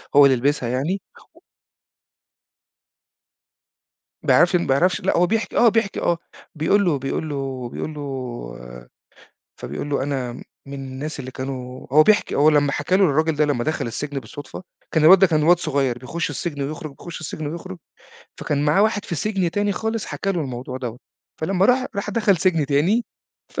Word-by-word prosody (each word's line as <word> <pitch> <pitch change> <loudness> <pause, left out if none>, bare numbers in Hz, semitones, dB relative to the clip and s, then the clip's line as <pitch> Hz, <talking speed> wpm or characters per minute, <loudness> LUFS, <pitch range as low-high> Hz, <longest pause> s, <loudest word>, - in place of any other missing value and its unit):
هو 145 0 +9
اللي 135 -1 +5
لبسها 130 -1 0
يعني 150 +11 -1 0.3
و - - -19 2.8
ما - - +3
يعرفش 175 +1 +5
إن 175 - +1
ما 135 - +3
يعرفش، 180 +7 +2
لأ 190 - +1
هو 175 +1 +4
بيحكي، 225 +3 -1
آه 240 - +6
بيحكي 225 -2 0
آه، 170 - +1 0.4
بيقول 195 +6 +2
له 150 -6 +1
بيقول 135 +4 -3
له 135 -3 -4
بيقول 155 - -5
له 150 - -8 1.6
فبيقول 145 - -5
له 140 - 0
أنا 135 -3 -2 0.3
من 140 - -8
الناس 135 +2 -6
اللي 130 -1 -7
كانوا 130 -1 -6
هو 155 +2 +8
بيحكي، 210 +6 +3
هو 150 +2 +5
لما 145 -2 +3
حكى 150 +6 +1
له 195 - +4
الراجل 160 0 +2
ده 150 - +3
لما 140 -5 0
دخل 155 -4 -1
السجن 140 +4 -4
بالصدفة، 145 +5 -9 0.3
كان 160 -2 +2
الواد 185 +4 +9
ده 195 - +6
كان 155 -4 +1
واد 175 +3 +5
صغير 140 -7 0
بيخش 160 +7 -3
السجن 145 0 -4
ويخرج، 155 +2 -5
بيخش 170 -2 -8
السجن 155 0 -5
ويخرج، 145 - -6 0.6
فكان 145 0 -1
معاه 155 +7 +4
واحد 210 -1 +1
في - - -4
سجن 190 +1 -1
تاني 205 +2 0
خالص 220 +3 -3
حكى 195 - -2
له 175 - -1
الموضوع 130 -2 -5
دوّة. 125 -2 -5 0.4
فلما 185 +3 +1
راح 255 +1 +3
راح 200 +1 -2
دخل 210 -2 +2
سجن 165 -4 +1
تاني، 170 - +2 0.4
ف. - - -5
155 Hz, 180 wpm, -22 LUFS, 135-185 Hz, 2.8 s, هو